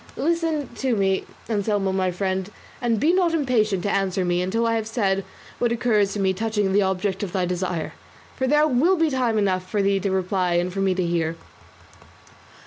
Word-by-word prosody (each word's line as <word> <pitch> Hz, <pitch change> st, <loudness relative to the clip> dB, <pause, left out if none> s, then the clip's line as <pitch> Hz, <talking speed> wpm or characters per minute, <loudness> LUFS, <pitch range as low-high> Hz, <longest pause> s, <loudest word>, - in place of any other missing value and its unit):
Listen 320 Hz, -1 st, 0 dB
to 260 Hz, -3 st, 0 dB
me, 195 Hz, -2 st, +1 dB, 0.2 s
Anselmo 205 Hz, -3 st, 0 dB
my 190 Hz, -1 st, 0 dB
friend, 190 Hz, +1 st, -2 dB, 0.3 s
and 235 Hz, -3 st, +1 dB
be 320 Hz, +9 st, +3 dB
not 355 Hz, -3 st, +2 dB
impatient 215 Hz, -, +1 dB
to 205 Hz, -, 0 dB
answer 190 Hz, -1 st, 0 dB
me 175 Hz, 0 st, +1 dB
until 215 Hz, +6 st, 0 dB
I 230 Hz, -, +1 dB
have 220 Hz, -1 st, -1 dB
said 195 Hz, -4 st, 0 dB, 0.4 s
what 240 Hz, -, +1 dB
occurs 220 Hz, -4 st, +2 dB
to 210 Hz, -, -4 dB
me 190 Hz, -1 st, +2 dB
touching 210 Hz, -1 st, -1 dB
the 205 Hz, -, +4 dB
object 190 Hz, 0 st, -1 dB
of 195 Hz, -3 st, -4 dB
thy 185 Hz, -2 st, +1 dB
desire, 180 Hz, -2 st, -3 dB, 0.4 s
for 260 Hz, -, -1 dB
there 295 Hz, +3 st, +4 dB
will 310 Hz, +8 st, +3 dB
be 325 Hz, -2 st, +2 dB
time 245 Hz, -4 st, +1 dB
enough 190 Hz, -3 st, +1 dB
left 185 Hz, -, -19 dB
for 205 Hz, -2 st, 0 dB
thee 195 Hz, 0 st, +2 dB
to 195 Hz, -, -1 dB
reply 185 Hz, -1 st, 0 dB
and 175 Hz, +1 st, 0 dB
for 195 Hz, -, -3 dB
me 190 Hz, -1 st, +1 dB
to 185 Hz, -1 st, 0 dB
hear." 165 Hz, -1 st, -1 dB
200 Hz, 205 wpm, -23 LUFS, 185-235 Hz, 0.4 s, the